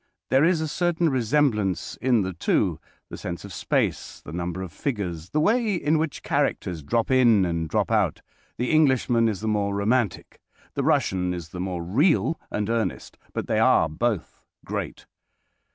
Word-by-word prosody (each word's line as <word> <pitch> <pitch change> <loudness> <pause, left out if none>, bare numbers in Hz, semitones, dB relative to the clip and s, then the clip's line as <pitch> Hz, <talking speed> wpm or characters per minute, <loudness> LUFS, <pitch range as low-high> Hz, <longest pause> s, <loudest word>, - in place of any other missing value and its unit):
There 135 +2 +5
is 165 -1 +3
a 160 - -1
certain 170 +1 +1
resemblance 115 - +1
in 120 -5 +3
the 95 0 -3
two—the 85 - -2
sense 85 +2 -6
of 100 - -9
space, - - -1
the 75 - -8
number 90 +1 -3
of 90 - -7
figures, 90 - -4
the 150 - 0
way 215 +4 +2
in 155 -2 +1
which 160 -2 -3
characters 85 -3 -1
drop 115 - 0
in 120 -7 +5
and 85 -2 -2
drop - - 0
out. - - +1 0.3
The 125 - -1
Englishman 130 -6 +3
is 105 -3 -4
the 110 - -3
more 100 -2 0
romantic. 110 +2 -1 0.3
The - - -1
Russian 90 -1 +1
is 85 -2 -7
the 90 - -8
more 90 -2 -3
real 150 - +2
and 105 -1 -2
earnest. 115 0 -2
But - - -3
they - - 0
are - - +4
both 105 +4 -3 0.2
great. - - -5
110 Hz, 170 wpm, -25 LUFS, 90-140 Hz, 0.3 s, There